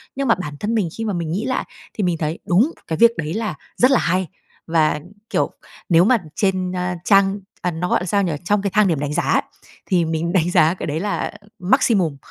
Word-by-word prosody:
Nhưng 275 Hz, 0 st, -1 dB
mà 230 Hz, -, +5 dB
bản 150 Hz, -6 st, -6 dB
thân 220 Hz, +2 st, -1 dB
mình 200 Hz, -7 st, +1 dB
khi 225 Hz, -, -3 dB
mà 210 Hz, -, -1 dB
mình 170 Hz, -3 st, -3 dB
nghĩ 195 Hz, +6 st, -2 dB
lại 260 Hz, 0 st, -1 dB, 0.3 s
thì 210 Hz, -, -2 dB
mình 175 Hz, -2 st, +1 dB
thấy 155 Hz, +1 st, -3 dB
đúng, 210 Hz, -, +3 dB, 0.2 s
cái 160 Hz, -, -2 dB
việc 235 Hz, 0 st, +6 dB
đấy 155 Hz, 0 st, -3 dB
là 215 Hz, -5 st, -2 dB, 0.2 s
rất 255 Hz, +2 st, +5 dB
là 265 Hz, -, +5 dB
hay. 185 Hz, +1 st, 0 dB, 0.4 s
Và, 160 Hz, -2 st, +2 dB, 0.3 s
kiểu, -, -, 0 dB, 0.4 s
nếu 170 Hz, -1 st, +6 dB
mà 250 Hz, +3 st, +5 dB, 0.2 s
trên, 185 Hz, -2 st, 0 dB
a, 180 Hz, 0 st, -2 dB
trang 195 Hz, 0 st, +4 dB, 0.2 s
à, 180 Hz, -, 0 dB
nó 175 Hz, +2 st, -3 dB
gọi -, -, +1 dB
sao 200 Hz, +2 st, +1 dB
nhỉ? 175 Hz, -, 0 dB
Trong 205 Hz, +2 st, +2 dB
cái 200 Hz, -, -1 dB
thang 210 Hz, 0 st, +4 dB
điểm 165 Hz, -5 st, 0 dB
đánh 145 Hz, 0 st, -2 dB
giá -, -, 0 dB
ấy, -, -, +2 dB, 0.4 s
thì 180 Hz, -4 st, +2 dB
mình 165 Hz, +1 st, -2 dB
đánh 175 Hz, -1 st, +2 dB
giá 160 Hz, -1 st, +4 dB
cái 185 Hz, -, -6 dB
đấy 150 Hz, +1 st, -2 dB
là 200 Hz, +3 st, -2 dB, 0.3 s
maximum, 185 Hz, -, +2 dB
180 Hz, 235 wpm, -20 LUFS, 165-210 Hz, 0.4 s, việc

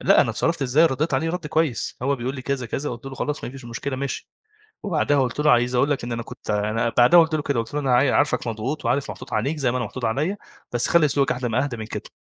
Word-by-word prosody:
لأ -, -, +5 dB
أنا -, -, +2 dB
اتصرّفت 165 Hz, -3 st, -1 dB
إزاي؟ 140 Hz, +6 st, +4 dB
ردّيت 145 Hz, 0 st, -1 dB
عليه 160 Hz, +5 st, 0 dB
رَد 175 Hz, -2 st, -4 dB
كويس. 150 Hz, -9 st, 0 dB
هو 140 Hz, +1 st, +1 dB
بيقول 125 Hz, +2 st, -3 dB
لي 130 Hz, -, -7 dB
كذا، 135 Hz, -2 st, -2 dB
كذا. 135 Hz, +5 st, -3 dB
قُلت 120 Hz, +2 st, -8 dB
له: 135 Hz, -, -6 dB
"خلاص 150 Hz, +3 st, -3 dB
ما -, -, -5 dB
فيش 135 Hz, -1 st, -11 dB
مشكلة 120 Hz, +3 st, -4 dB
ماشي." 140 Hz, +1 st, -4 dB, 0.5 s
وبعدها 155 Hz, -7 st, +1 dB
قُلت 125 Hz, +2 st, -1 dB
له: 150 Hz, 0 st, +4 dB
"عايز 120 Hz, +1 st, +3 dB
أقول 135 Hz, +4 st, +2 dB
لك 140 Hz, -4 st, -1 dB
إن 120 Hz, -, -4 dB
أنا 115 Hz, 0 st, -3 dB
كنت -, -, -8 dB
ع" 105 Hz, 0 st, 0 dB
أنا 115 Hz, +2 st, 0 dB
بعدها 125 Hz, +8 st, +8 dB
قُلت 160 Hz, -1 st, +2 dB
له 155 Hz, -, 0 dB
كده 140 Hz, -3 st, -1 dB
قُلت 115 Hz, +4 st, -7 dB
له: 150 Hz, -, 0 dB
"أنا 135 Hz, -3 st, +2 dB
عاي 130 Hz, +3 st, +4 dB
عارفك 145 Hz, -3 st, +1 dB
مضغوط 120 Hz, +7 st, -3 dB
وعارف 130 Hz, +4 st, 0 dB
محطوط 130 Hz, -, -10 dB
عليك 125 Hz, +9 st, 0 dB
زي 135 Hz, -5 st, +1 dB
ما 125 Hz, -, -1 dB
أنا 125 Hz, -, -1 dB
محطوط 120 Hz, +3 st, -6 dB
عليّا، 145 Hz, -, 0 dB, 0.4 s
بس 120 Hz, 0 st, +2 dB
خلّي 170 Hz, -3 st, +5 dB
أسلوبك 140 Hz, -2 st, +1 dB
أهدا 125 Hz, 0 st, -3 dB
ما 120 Hz, +3 st, +1 dB
أهدا 135 Hz, -4 st, -4 dB
من 110 Hz, -1 st, -6 dB
كده." -, -, -7 dB
130 Hz, 280 wpm, -23 LUFS, 120-150 Hz, 0.5 s, بعدها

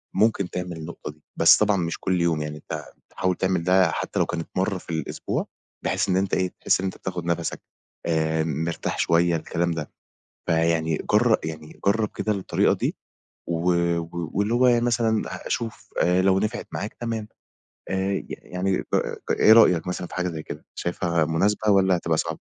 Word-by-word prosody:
ممكن 100 Hz, -2 st, +2 dB
تعمل 90 Hz, -1 st, -4 dB
النقطة 80 Hz, -1 st, -7 dB
دي، 75 Hz, 0 st, -24 dB
بس -, -, +7 dB
طبعًا 105 Hz, -1 st, +3 dB
مش 85 Hz, -2 st, -2 dB
كل 90 Hz, -2 st, 0 dB
يوم 80 Hz, -3 st, +1 dB
يعني 75 Hz, 0 st, -4 dB
أنت -, -, -6 dB, 0.3 s
تحاول 95 Hz, -1 st, -1 dB
تعمل 95 Hz, -2 st, 0 dB
ده 90 Hz, -1 st, +4 dB
حتى -, -, -3 dB
لو -, -, +3 dB
كانت 85 Hz, -1 st, -4 dB
مرّة 95 Hz, +1 st, +1 dB
في 90 Hz, -, -14 dB
الأسبوع، 80 Hz, -1 st, -3 dB, 0.4 s
بحيث -, -, 0 dB
إن 90 Hz, -, +3 dB
أنت 95 Hz, 0 st, -1 dB
إيه 95 Hz, -1 st, +1 dB
تحس -, -, +3 dB
إن -, -, -2 dB
أنت 95 Hz, -, -3 dB
بتاخد 90 Hz, -2 st, -5 dB
نفسك 85 Hz, -1 st, -2 dB, 0.4 s
آآ 80 Hz, -1 st, +1 dB
م 80 Hz, -1 st, -2 dB
مرتاح 85 Hz, 0 st, -3 dB
شوية 85 Hz, 0 st, +3 dB
الكلام 85 Hz, +2 st, -1 dB
ده، 80 Hz, -2 st, -4 dB, 0.6 s
فيعني 80 Hz, -1 st, +2 dB
جر 110 Hz, +1 st, +5 dB
يعني 80 Hz, -1 st, -7 dB
جرب 105 Hz, +1 st, +3 dB
كده 110 Hz, -, 0 dB
الطريقة 95 Hz, -2 st, +1 dB
دي. -, -, -2 dB, 0.5 s
و 85 Hz, +2 st, +1 dB, 0.4 s
واللي 95 Hz, +6 st, -1 dB
هو 125 Hz, +1 st, +4 dB
يعني 120 Hz, -1 st, +4 dB
مثلًا 115 Hz, -2 st, +2 dB, 0.2 s
شوف 115 Hz, -2 st, -4 dB
آآ 90 Hz, +1 st, +3 dB
لو 95 Hz, 0 st, +3 dB
نفعِت 110 Hz, +4 st, -2 dB
معاك 105 Hz, -, -4 dB
تمام، 115 Hz, -2 st, -4 dB, 0.6 s
آآ 95 Hz, +1 st, 0 dB
ي -, -, -3 dB
يعني 90 Hz, +1 st, -2 dB, 0.5 s
إيه 110 Hz, -, +6 dB
رأيك 90 Hz, -7 st, +5 dB
مثلًا 90 Hz, -1 st, -3 dB
في -, -, -10 dB
حاجة 90 Hz, 0 st, 0 dB
زي 80 Hz, -2 st, -6 dB
كده، -, -, -8 dB
شايفها 85 Hz, -2 st, 0 dB
مناسبة 100 Hz, +7 st, +1 dB
والّا 95 Hz, -2 st, +4 dB
هتبقى 85 Hz, -2 st, 0 dB
صعب؟ 80 Hz, 0 st, -2 dB
90 Hz, 180 wpm, -24 LUFS, 80-100 Hz, 0.6 s, بس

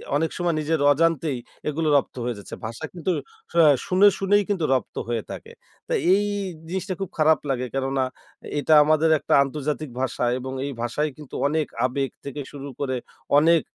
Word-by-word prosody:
অনেক 160 Hz, +2 st, +1 dB
সময় 175 Hz, -2 st, 0 dB
নিজের 155 Hz, +1 st, 0 dB
অজান্তেই 160 Hz, -2 st, +1 dB, 0.3 s
এগুলো 155 Hz, +2 st, -1 dB
রপ্ত 140 Hz, -, -2 dB
হয়ে 120 Hz, -1 st, -2 dB
যাচ্ছে। 100 Hz, -, -8 dB
ভাষা 115 Hz, +8 st, -5 dB
কিন্তু 180 Hz, +1 st, -2 dB, 0.4 s
শা 170 Hz, -, +1 dB, 0.3 s
শুনে, 190 Hz, +3 st, +5 dB
শুনেই 205 Hz, +1 st, +3 dB
কিন্তু 185 Hz, -6 st, 0 dB
রপ্ত 130 Hz, -, -1 dB
হয়ে 115 Hz, -2 st, -1 dB
থাকে। -, -, -8 dB, 0.4 s
তো -, -, -9 dB, 0.2 s
এ -, -, +8 dB
এই 205 Hz, +1 st, +1 dB, 0.4 s
জিনিসটা 190 Hz, +1 st, -2 dB
খুব 195 Hz, -, -3 dB
খারাপ 155 Hz, 0 st, +4 dB
লাগে। 125 Hz, -1 st, 0 dB
কেননা 135 Hz, 0 st, 0 dB, 0.6 s
এটা 155 Hz, +2 st, +3 dB
আমাদের 155 Hz, +1 st, +3 dB
একটা -, -, -1 dB
আন্তর্জাতিক 150 Hz, +1 st, -3 dB
ভাষা 130 Hz, -1 st, -1 dB, 0.2 s
এবং 130 Hz, +1 st, -6 dB
এই 140 Hz, -, -3 dB
ভাষায় 135 Hz, +6 st, -1 dB
কিন্তু 150 Hz, -3 st, -10 dB
অনেক 155 Hz, +1 st, 0 dB, 0.2 s
আবেগ 135 Hz, +1 st, -1 dB, 0.2 s
থেকে 140 Hz, +1 st, -5 dB
শুরু 140 Hz, -1 st, -8 dB
করে 130 Hz, -2 st, -1 dB, 0.4 s
অনেক 165 Hz, +1 st, +5 dB
150 Hz, 175 wpm, -24 LUFS, 135-165 Hz, 0.6 s, এ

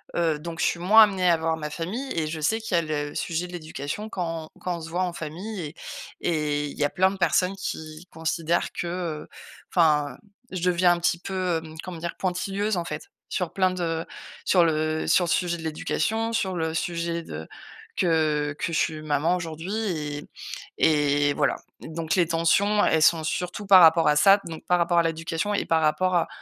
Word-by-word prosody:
heu, 165 Hz, -3 st, +1 dB
donc 165 Hz, +1 st, -7 dB
je -, -, +2 dB
suis 170 Hz, -, 0 dB
moins 215 Hz, +5 st, +8 dB
amenée 190 Hz, -4 st, +2 dB
à 165 Hz, -, +4 dB
voir 160 Hz, 0 st, 0 dB
ma 150 Hz, -1 st, -4 dB
famille 195 Hz, -, -4 dB
et 160 Hz, -, +1 dB
je 155 Hz, 0 st, -4 dB
sais 220 Hz, +9 st, +1 dB
qu'il 220 Hz, -5 st, -2 dB
y 170 Hz, -, +5 dB
a -, -, +1 dB
le 145 Hz, -2 st, -3 dB
sujet 170 Hz, +1 st, -2 dB
de 180 Hz, -, -10 dB
l'éducation 160 Hz, +4 st, -5 dB
quand 165 Hz, -5 st, -4 dB
quand 180 Hz, -1 st, -3 dB
on 165 Hz, -, -9 dB
se 165 Hz, -, -8 dB
voit 175 Hz, +3 st, -1 dB
en 180 Hz, -1 st, -2 dB
famille 180 Hz, +7 st, -6 dB
et 150 Hz, +1 st, -7 dB, 0.5 s
et 150 Hz, -3 st, 0 dB
il -, -, -9 dB
y -, -, 0 dB
a 145 Hz, -, +2 dB
plein 190 Hz, +3 st, +2 dB
de 195 Hz, -, -7 dB
personnes 185 Hz, +1 st, +2 dB
qui 160 Hz, -3 st, -6 dB
considèrent 160 Hz, +1 st, -1 dB
que, 175 Hz, -, -4 dB
heu, 170 Hz, -3 st, -4 dB, 0.4 s
enfin, 150 Hz, -6 st, +3 dB, 0.3 s
je 185 Hz, -2 st, -4 dB
deviens 175 Hz, 0 st, +4 dB
un 170 Hz, -, -3 dB
petit 175 Hz, 0 st, +1 dB
peu, 185 Hz, -2 st, -1 dB
hem, 160 Hz, -1 st, -11 dB
comment 175 Hz, -3 st, -7 dB
dire? 170 Hz, 0 st, -4 dB
Pointilleuse, 195 Hz, +3 st, -1 dB
en 175 Hz, -, -1 dB
fait, 400 Hz, -, -6 dB, 0.2 s
sur -, -, -2 dB
plein 185 Hz, -1 st, +3 dB
de 165 Hz, -3 st, -2 dB, 0.4 s
sur 180 Hz, -2 st, +4 dB
le 155 Hz, 0 st, 0 dB
sur 180 Hz, -, +3 dB
le 170 Hz, -, -3 dB
sujet 175 Hz, 0 st, +1 dB
de -, -, -8 dB
l'éducation, 220 Hz, +8 st, -1 dB
sur 190 Hz, -5 st, 0 dB
le 160 Hz, -1 st, -1 dB
sujet 170 Hz, 0 st, -2 dB
de 80 Hz, -, -8 dB, 0.5 s
que 155 Hz, -4 st, +1 dB
que 170 Hz, -, -3 dB
je -, -, +1 dB
suis 155 Hz, -1 st, -1 dB
maman 155 Hz, +3 st, +1 dB
aujourd'hui 165 Hz, -3 st, -4 dB, 0.5 s
et 145 Hz, -2 st, +3 dB
et -, -, +1 dB
voilà. 140 Hz, -, +1 dB, 0.2 s
Donc 160 Hz, 0 st, -3 dB
les 175 Hz, -3 st, +3 dB
tensions, 195 Hz, +6 st, +3 dB
elles 160 Hz, -1 st, +3 dB
sont 165 Hz, -1 st, +4 dB
surtout 180 Hz, +5 st, -3 dB
par 190 Hz, -2 st, +9 dB
rapport 165 Hz, 0 st, +6 dB
à 150 Hz, -, +4 dB
ça, 195 Hz, +6 st, +6 dB
donc 160 Hz, -1 st, -8 dB
par 180 Hz, 0 st, +2 dB
rapport 170 Hz, 0 st, +2 dB
à 170 Hz, -, +5 dB
l'éducation 165 Hz, +4 st, -2 dB
et 205 Hz, -, 0 dB
par 165 Hz, -1 st, +2 dB
rapport 180 Hz, +4 st, +2 dB
à 170 Hz, -, +2 dB
170 Hz, 210 wpm, -25 LUFS, 155-185 Hz, 0.5 s, par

